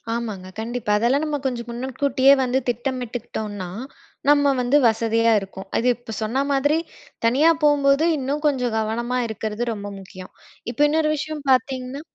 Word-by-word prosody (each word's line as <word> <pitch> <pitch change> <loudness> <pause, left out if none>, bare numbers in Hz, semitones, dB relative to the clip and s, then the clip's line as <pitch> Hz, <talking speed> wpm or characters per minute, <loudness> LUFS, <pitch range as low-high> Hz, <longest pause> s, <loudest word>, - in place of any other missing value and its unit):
ஆமாங்க, 215 -6 -5
கண்டிப்பா. 230 -1 -3
அதெல்லாம் 250 +7 +2
நம்ம 300 -1 -1
கொஞ்ச 250 -3 -1
முன்னக்கூட்டியே 265 +2 +2
வந்து 255 +1 +1
திட்டமிட்டுக்கிட்டோன்னா, 235 -5 -4 0.6
நம்ம 285 -1 +5
வந்து 250 +4 +3
வசதியா 230 0 +2
இருக்கும். 195 0 -9
அது 240 - +1
இப்போ 235 -2 -9
சொன்ன 250 +6 0
மாதிரி, 290 +3 +2 0.5
தனியா 275 +8 +5
போம்போது 290 0 +4
இன்னும் 285 +2 -3
கொஞ்சம் 250 -5 0
கவனமா 235 +3 -1
இருக்கிறது 220 +2 -3
ரொம்ப 205 -1 -6
முக்கியம். 185 -1 -12 0.4
இப்போ 245 - -4
இன்னொரு 310 0 +2
விஷயம் 295 0 -5
பாத்தீங்ன்னா 260 +1 0
245 Hz, 140 wpm, -22 LUFS, 225-280 Hz, 0.6 s, நம்ம